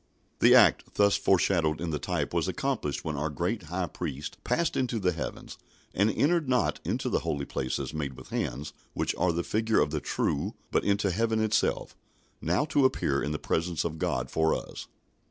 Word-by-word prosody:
The - - +7
act - - +5
thus 100 -1 +4
foreshadowed 85 -4 +2
in 85 -1 -3
the 75 - -2
type - - -2
was - - +1
accomplished - - -2
when 75 - -2
our 75 +2 -1
great 90 +9 -2
High 90 +1 -1
Priest 75 -3 -6
passed 170 -1 0
into 125 -3 0
the 95 -4 +1
heavens, 80 - -6 0.3
and 100 +3 +3
"entered 155 +5 +1
not 125 -2 +1
into - - -2
the - - +1
holy 70 -1 -2
places 65 +3 -3
made 75 -3 -3
with - - -12
hands, 70 +5 -3 0.2
which - - 0
are 90 - +2
the 85 +1 -1
figure 110 +3 +1
of 75 - +2
the 75 -2 -2
true; - - -1 0.2
but - - +2
into 100 -1 +1
heaven 110 +3 +1
itself, 110 -1 0 0.5
now 90 - +1
to 145 -2 +2
appear 70 - +2
in 75 - -2
the 75 - -1
presence 85 +1 -1
of 80 -2 -4
God 60 -3 -1
for 80 0 +2
us." - - -7
85 Hz, 190 wpm, -28 LUFS, 75-110 Hz, 0.5 s, The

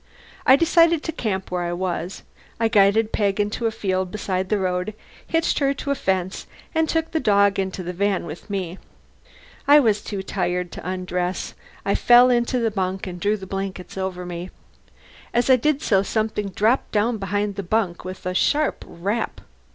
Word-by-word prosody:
I 260 - +9
decided 335 +1 +4
to - - -2
camp 200 - -3
where 180 -1 -1
I 175 0 -2
was. 180 0 -3 0.4
I 225 -1 +2
guided 215 +1 +4
Peg 200 -1 0
into 210 +3 0
a - - 0
field 190 -4 -1
beside 190 -2 -2
the 210 - +2
road, 185 +2 -1 0.3
hitched 325 0 +1
her 275 -1 +1
to 280 0 -3
a - - +2
fence, 190 -4 -2 0.3
and 320 -1 +1
took 325 0 0
the 320 - 0
dog 200 -5 +3
into 190 -1 -2
the 180 +1 -4
van 195 0 0
with 165 +6 -9
me. 190 -2 -3 0.9
I 290 +1 +8
was 215 -6 +2
too 200 -2 -4
tired 180 -2 -2
to - - -6
undress. 180 0 -3 0.3
I - - +2
fell 245 +1 +6
into 240 +1 +1
the 230 -2 +1
bunk 190 -1 -2
and 180 -2 -6
drew 205 +3 +1
the 190 - -9
blankets 195 -1 -5
over 190 -2 -3
me. 175 +1 -6 0.9
As 240 +2 +3
I - - +9
did 295 +4 0
so, 195 -3 +3
something 215 0 -1
dropped 220 +7 +1
down 220 +2 +1
behind 205 +1 -1
the 200 - -4
bunk 190 -2 -1
with 185 0 -8
a 180 - -1
sharp 300 +10 +1
rap. 200 +7 -3
200 Hz, 185 wpm, -23 LUFS, 185-230 Hz, 0.9 s, I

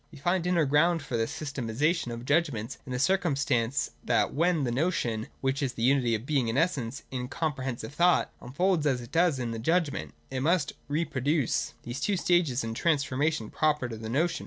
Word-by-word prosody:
"We - - -12
find 175 +5 0
the 180 - -1
inner 170 -4 +3
ground 160 +3 +3
for 120 - -4
this 115 -1 0
sys 145 -2 -5
tematisation 135 +4 0
of 120 +1 -6
judgments 140 -6 0
in - - -6
the 125 - -1
circumstance 140 -6 +1
that - - +1
when 165 0 +2
the 120 - 0
Notion, 120 -6 0
which 135 +1 0
is 135 -3 -1
the 115 - -4
unity 125 -3 +3
of 110 +2 -5
Being 135 -5 +1
and 115 - -1
Essence 140 -5 0
in 125 -1 -3
a - - -7
com 155 +3 -1
prehensive 130 -1 -5
thought, 175 +5 +3
unfolds, 160 +4 +1
as 130 -3 +1
it 120 - -11
does 165 -2 +3
in 120 -2 -3
the 115 - -4
judgment, 160 +4 0 0.2
it 130 - -2
must 155 +1 +1
reproduce 145 -2 0
these 120 +2 -5
two 200 -2 0
stages 175 -9 +2
in 115 - -3
a - - -4
transformation 145 -3 0
proper 150 -4 +1
to 115 - -6
the 110 0 -7
notion. 160 +8 +1
140 Hz, 210 wpm, -28 LUFS, 125-165 Hz, 0.2 s, inner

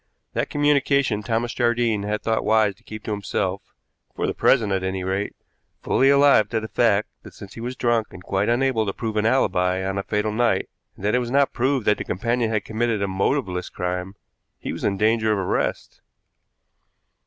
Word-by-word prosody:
That - - -1
communication 140 -6 +2
Thomas 115 +2 -1
Jardine 120 -3 +1
had 105 +1 -3
thought 110 -1 0
wise 110 -2 +3
to - - -29
keep 110 -1 -9
to - - -4
himself 100 -1 -2 0.5
for - - -1
the - - -1
present, 105 -3 +3
at 95 - 0
any 95 0 -3
rate 95 +2 -2 0.5
fully 135 - +3
alive 140 -6 +5
to 115 - 0
the 110 - -6
fact 110 -3 +2
that, - - -14
since 100 0 -11
he 115 - -9
was 125 +2 -4
drunk 120 -3 +1
and 90 - -11
quite 95 +2 0
unable 120 -3 +1
to 100 - -1
prove 110 0 -4
an 105 +1 +2
alibi 95 -6 +1
on 95 0 -2
the - - 0
fatal 105 +1 -1
night, 110 -3 +1 0.3
and 100 - -8
that 105 - +2
it 125 - +3
was 120 -1 -3
not 140 +2 +2
proved 130 -1 0
that 105 - +2
the - - -2
companion 115 +5 -1
had 110 -2 -1
committed 110 -2 -1
a - - 0
motiveless 95 -1 -1
crime, 90 +2 -4 0.4
he - - -5
was - - -7
in 100 - 0
danger 110 +1 +2
of 105 - +1
arrest. 95 -2 -2
110 Hz, 200 wpm, -23 LUFS, 100-120 Hz, 0.5 s, alive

